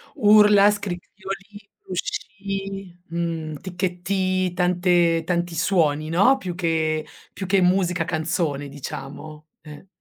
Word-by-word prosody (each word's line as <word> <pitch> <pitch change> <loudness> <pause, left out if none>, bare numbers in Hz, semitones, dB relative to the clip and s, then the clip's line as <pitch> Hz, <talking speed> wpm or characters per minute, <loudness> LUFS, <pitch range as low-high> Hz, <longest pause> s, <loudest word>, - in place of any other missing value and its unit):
Urla, 210 -1 +6
scricchiolii, 200 +1 -7
fruscii, 195 0 -5
mhmm, 165 -2 -3
ticchettii, 185 0 -1
tante 175 -2 +2
tanti 175 -1 -1
suoni, 155 -4 +1
no, 200 +11 +5
più 180 -9 -5
che 160 -3 0 0.3
più 190 - -5
che 195 +1 +3
musica 180 -1 +2
canzone, 160 -3 -2
diciamo, 145 +3 -8
ehm. 150 +3 -12
180 Hz, 100 wpm, -23 LUFS, 165-195 Hz, 0.3 s, Urla